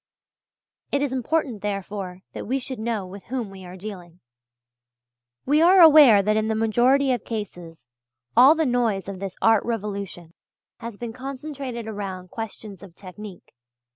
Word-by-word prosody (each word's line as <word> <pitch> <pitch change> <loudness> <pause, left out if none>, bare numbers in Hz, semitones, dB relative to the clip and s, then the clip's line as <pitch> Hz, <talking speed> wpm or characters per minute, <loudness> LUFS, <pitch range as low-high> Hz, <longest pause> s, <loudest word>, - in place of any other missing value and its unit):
It 280 0 +1
is 275 -3 -2
important, 260 -3 -1
therefore, 195 -2 -5
that - - -7
we 260 +4 0
should 260 -2 -6
know 220 -3 -2
with 190 +1 -11
whom 240 -5 -4
we 190 -1 -11
are 180 +1 -10
dealing. 180 -3 -9 1.3
We 295 +4 +3
are 365 +3 +6
aware 295 - +8
that 215 +2 +1
in 220 0 0
the 220 - 0
majority 245 +5 +3
of 245 -4 -1
cases 175 - -7 0.5
all 260 +6 +8
the 320 -1 +1
noise 230 -7 0
of 195 -2 -6
this 195 -1 -6
art 225 -2 +4
revolution 200 -6 -5 0.5
has 230 -3 -8
been 235 0 -6
concentrated 265 -2 -6
around 190 -4 -6
questions 215 -3 -8
of 190 -4 -13
technique. 195 0 -11
220 Hz, 155 wpm, -24 LUFS, 195-255 Hz, 1.3 s, aware